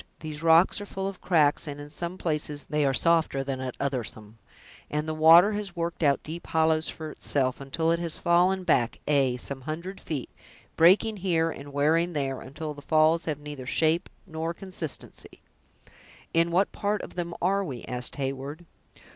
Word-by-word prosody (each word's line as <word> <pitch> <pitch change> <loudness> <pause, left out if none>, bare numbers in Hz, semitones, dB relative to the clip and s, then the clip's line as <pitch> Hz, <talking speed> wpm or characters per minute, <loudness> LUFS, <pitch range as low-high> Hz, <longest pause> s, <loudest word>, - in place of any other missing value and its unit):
These 155 -1 -6
rocks 165 +4 +5
are 205 - -7
full 195 0 -4
of 195 -2 -7
cracks, 155 -5 +2
and 145 0 -6
in 145 0 -8
some 170 +3 -4
places 150 -3 -2
they 150 -1 0
are - - +3
softer 160 -3 +2
than 135 -1 -4
at 130 -1 -5
othersome, 115 -5 -4 0.5
and 150 +1 -2
the 155 - -1
water 165 +5 +7
has 205 -3 -4
worked 170 0 -3
out 140 -3 +2
deep 165 +3 -7
hollows 160 0 +2
for 155 -1 -6
itself, 130 -3 0
until 160 +4 0
it 170 - +1
has 170 -2 -3
fallen 180 +2 +3
back, 120 -9 +1
ay, 135 -4 +3
some 135 +2 -5
hundred 170 +7 -6
feet, 145 -6 -5 0.4
breaking 205 +6 +5
here 165 -4 +1
and 140 -1 -9
wearing 160 +5 +2
there, 135 -3 -2
until 150 +3 -6
the 145 - -11
falls 155 +3 +3
have 155 -3 -2
neither 145 -3 -8
shape 160 +5 +1 0.2
nor 160 +1 -4
consistency." 180 -6 -7 0.9
"In 165 +1 +3
what 185 +4 +2
part 205 0 -2
of - - -8
them 170 -1 -4
are 195 +3 +1
we?" 130 -10 -6
asked 125 0 -6
Heyward. 140 +4 -4
160 Hz, 180 wpm, -27 LUFS, 145-170 Hz, 0.9 s, water